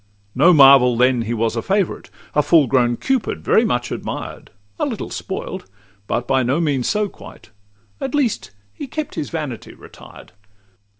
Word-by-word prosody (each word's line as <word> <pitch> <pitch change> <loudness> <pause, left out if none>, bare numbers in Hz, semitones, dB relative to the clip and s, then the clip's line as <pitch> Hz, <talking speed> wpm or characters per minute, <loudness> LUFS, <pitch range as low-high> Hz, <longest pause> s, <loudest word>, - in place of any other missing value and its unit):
No 180 - +5
marvel 135 -5 +6
then 125 0 +3
he 115 +1 -3
was 115 0 -1
a - - -1
favourite; 195 -2 -1 0.2
A 150 - +3
full 155 0 +4
grown 120 -2 +1
Cupid, 265 -3 -2
very 220 - +3
much 120 - -1
admired; - - -6 0.3
A - - +1
little - - -5
spoilt, - - -6 0.4
but 120 - -2
by 135 -1 +2
no 130 +6 0
means 140 -7 0
so 210 -1 0
quite; 110 - -14 0.5
At 270 +1 -3
least 270 -7 -1 0.2
he 285 - -7
kept 305 +2 -5
his 145 - -4
vanity 150 -8 -6
retired. - - -15
140 Hz, 165 wpm, -19 LUFS, 125-195 Hz, 0.5 s, marvel